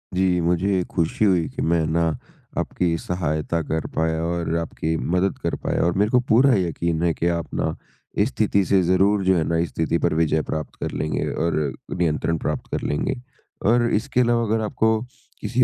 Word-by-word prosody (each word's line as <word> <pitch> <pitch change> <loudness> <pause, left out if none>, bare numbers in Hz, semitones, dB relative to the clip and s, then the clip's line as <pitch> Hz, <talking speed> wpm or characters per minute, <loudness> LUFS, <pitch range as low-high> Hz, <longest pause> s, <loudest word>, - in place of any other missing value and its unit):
जी, 90 -1 +2
मुझे 90 +2 +1
खुशी 85 +5 +1
हुई 90 -5 +3
कि - - -3
मैं 80 -1 +2
ना, 80 0 +1 0.4
आपकी 85 -2 0
सहायता 85 -1 -2
कर 80 +1 -2
पाया 80 0 0
और 85 -1 -1
आपकी 80 0 -2 0.2
मदद 95 +2 +1
कर - - 0
पाया - - 0
और 85 - +2
मेरे 105 +2 +2
को 125 - +5
पूरा 130 +4 +5
यकीन 85 -2 -1
है 85 -1 +2
कि, 85 - -1
आप 85 -2 -2
ना - - -1 0.4
इस 105 +4 +3
स्थिति 100 -5 +1
से 95 +2 +3
ज़रूर 95 +3 +3
जो 95 0 +4
है 80 - +2
ना, 85 - +1
इस 85 0 0
स्थिति 80 +1 0
पर - - +1
विजय 80 -1 +2
प्राप्त 75 0 -5
कर - - -2
लेंगे 75 - -2
और 80 -1 0 0.4
नियंत्रण 80 -1 0
प्राप्त 75 - -3
कर - - -1
लेंगे। 75 - -1 0.4
और 120 +2 +4
इसके 125 +4 +1
अलावा 120 -1 +2
अगर 110 +1 0
आपको 110 +1 +1 0.4
किसी 125 +1 +2
85 Hz, 190 wpm, -23 LUFS, 80-100 Hz, 0.4 s, को